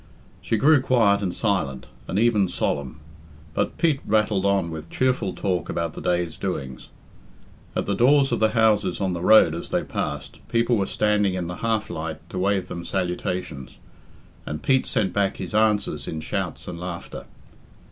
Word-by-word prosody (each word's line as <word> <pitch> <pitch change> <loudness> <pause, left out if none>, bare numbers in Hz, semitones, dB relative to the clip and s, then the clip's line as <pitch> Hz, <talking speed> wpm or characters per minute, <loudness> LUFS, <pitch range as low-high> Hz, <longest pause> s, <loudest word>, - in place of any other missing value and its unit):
She 115 - 0
grew 145 +4 +5
quiet 110 -6 +3
and 95 -3 -1
silent, 90 - -1 0.2
and 95 - -2
even 105 -4 +3
solemn. 70 -4 -2 0.5
But - - -1
Pete 160 -5 +2
rattled 105 -2 +1
on 100 -4 +1
with 80 -1 -7
cheerful 130 -7 0
talk 90 -3 -2
about 85 -2 -2
the - - -8
day's 85 -2 -1
doings. 70 -10 -4 0.9
At - - 0
the 100 - 0
doors 135 +5 +4
of 120 - +1
the 110 - +4
houses 110 -2 +3
on 95 -2 0
the 85 - -4
road 100 -5 +6
as 85 - -6
they - - 0
passed, - - -4
people 115 +1 +2
were 100 -3 0
standing 105 -3 +1
in 90 -2 -2
the 90 +1 -5
half 110 -2 -1
light 80 0 -6
to - - -3
wave 95 -1 +1
them 85 -1 -6
salutations, 90 -7 -3 0.7
and 75 +1 -6
Pete 130 -1 +2
sent 105 -7 0
back 100 -1 0
his 95 0 -6
answers 105 -9 +1
in 80 - -4
shouts 80 - -4
and 85 - -6
laughter. 90 -1 -7
95 Hz, 175 wpm, -24 LUFS, 85-110 Hz, 0.9 s, road